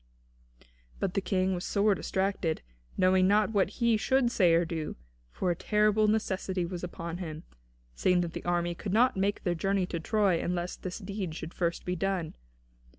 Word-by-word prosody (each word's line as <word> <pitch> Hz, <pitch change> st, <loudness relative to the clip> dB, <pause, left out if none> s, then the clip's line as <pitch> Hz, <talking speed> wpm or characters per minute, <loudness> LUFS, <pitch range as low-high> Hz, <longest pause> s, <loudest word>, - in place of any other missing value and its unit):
But 190 Hz, -2 st, -1 dB
the 195 Hz, -, 0 dB
King 190 Hz, 0 st, +1 dB
was 180 Hz, 0 st, -3 dB
sore 205 Hz, +1 st, +2 dB
distracted, 190 Hz, -4 st, -1 dB, 0.3 s
knowing 185 Hz, 0 st, +4 dB
not 210 Hz, +2 st, +3 dB
what 200 Hz, -3 st, +2 dB
he 235 Hz, -2 st, +2 dB
should 255 Hz, +2 st, +2 dB
say 175 Hz, -7 st, +4 dB
or 170 Hz, +1 st, +3 dB
do, 160 Hz, -2 st, -4 dB, 0.3 s
for 180 Hz, -, -1 dB
a -, -, 0 dB
terrible 210 Hz, +3 st, +2 dB
necessity 190 Hz, -4 st, 0 dB
was 175 Hz, 0 st, -6 dB
upon 170 Hz, -1 st, -5 dB
him, 160 Hz, -3 st, -6 dB, 0.5 s
seeing 180 Hz, -, +2 dB
that 170 Hz, -1 st, -3 dB
the -, -, -6 dB
army 175 Hz, 0 st, 0 dB
could 190 Hz, +3 st, -5 dB
not 250 Hz, +4 st, +4 dB
make 195 Hz, +1 st, 0 dB
their 175 Hz, -, +1 dB
journey 195 Hz, +2 st, 0 dB
to 175 Hz, -2 st, -4 dB
Troy 195 Hz, -1 st, +2 dB
unless 175 Hz, 0 st, -2 dB
this 185 Hz, -1 st, -6 dB
deed 195 Hz, -5 st, -5 dB
should 160 Hz, +1 st, -7 dB
first 170 Hz, -1 st, -2 dB
be 180 Hz, -, -1 dB
done. 185 Hz, -2 st, -1 dB
185 Hz, 180 wpm, -29 LUFS, 175-200 Hz, 0.5 s, knowing